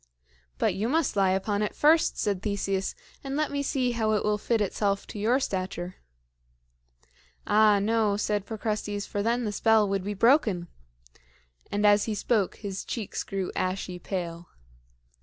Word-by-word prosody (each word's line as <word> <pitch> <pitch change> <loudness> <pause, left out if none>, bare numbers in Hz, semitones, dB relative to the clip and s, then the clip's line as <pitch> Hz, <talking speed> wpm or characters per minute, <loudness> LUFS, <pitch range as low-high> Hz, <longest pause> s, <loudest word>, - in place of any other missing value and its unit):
"But - - +1
you 205 +5 -1
must 320 0 +1
lie 195 -2 +3
upon 200 +2 0
it 210 - -2
first," 315 +2 +4
said 200 -3 -1
Theseus, 195 -2 -2 0.3
"and 270 0 -4
let 305 0 0
me 285 0 -1
see 265 -3 0
how 220 -2 0
it 210 - +1
will 210 0 +1
fit 230 +2 0
itself 200 0 0
to 210 - -8
your 235 +6 +2
stature." 185 -6 -3 1.5
"Ah, 210 -1 +5
no," 210 0 +1
said 205 -1 -1
Procrustes, 210 -2 -3
"for 205 - -3
then 235 +3 +1
the 210 - -1
spell 220 0 +3
would 195 -1 -1
be 205 +1 -3
broken," 210 - +3 1.0
and 205 +1 0
as 205 0 +5
he 220 - -2
spoke 205 -2 0
his 195 -2 -5
cheeks 220 -5 -4
grew 195 -2 -3
ashy 185 -1 -2
pale. 175 -2 -5
205 Hz, 160 wpm, -27 LUFS, 195-225 Hz, 1.5 s, Ah